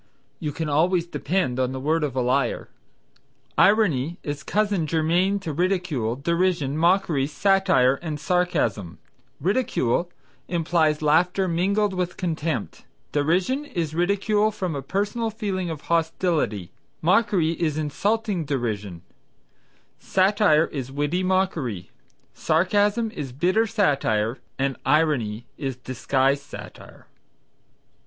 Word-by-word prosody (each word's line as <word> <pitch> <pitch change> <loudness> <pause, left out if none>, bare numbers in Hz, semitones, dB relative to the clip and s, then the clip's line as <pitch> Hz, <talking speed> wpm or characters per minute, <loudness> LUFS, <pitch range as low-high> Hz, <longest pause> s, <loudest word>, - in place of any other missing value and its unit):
"You 150 -4 -3
can 155 +2 -4
always 170 +4 +2
depend 170 -6 -1
upon 130 0 0
the 130 - -4
word 155 +4 0
of 140 -4 -2
a 130 - +1
liar." 125 0 0 0.9
Irony 175 - +3
is 145 0 -4
cousin 205 -6 0
germain 170 +5 +2
to 160 -5 -4
ridicule, 170 - 0
derision, 170 -1 0
mockery, 165 -4 +2
satire 155 -6 +3
and 155 -3 -4
sarcasm. 145 - 0 0.4
Ridicule 180 - 0 0.4
implies 160 -3 +1
laughter 180 +5 +3
mingled 195 +4 +1
with 180 -1 -3
contempt; 160 - -3 0.3
derision 180 - +1
is 170 - -3
ridicule 200 +5 +2
from 190 -7 -3
a 140 - -3
personal 205 - -1
feeling 200 -5 -3
of 160 -3 -5
hostility; 160 - 0 0.3
mockery 180 -2 +3
is 160 -2 -1
insulting 200 +5 -1
derision; 105 - -3 1.0
satire 190 -5 +3
is 135 -5 -6
witty 145 +6 -1
mockery; 175 - -1 0.4
sarcasm 205 +7 +1
is 145 - -6
bitter 185 - +1
satire 135 - +1 0.2
and 135 0 -1
irony 130 -7 +1
is 135 -3 -3
disguised 130 +2 0
satire. 140 - -12
165 Hz, 115 wpm, -24 LUFS, 140-190 Hz, 1.0 s, Irony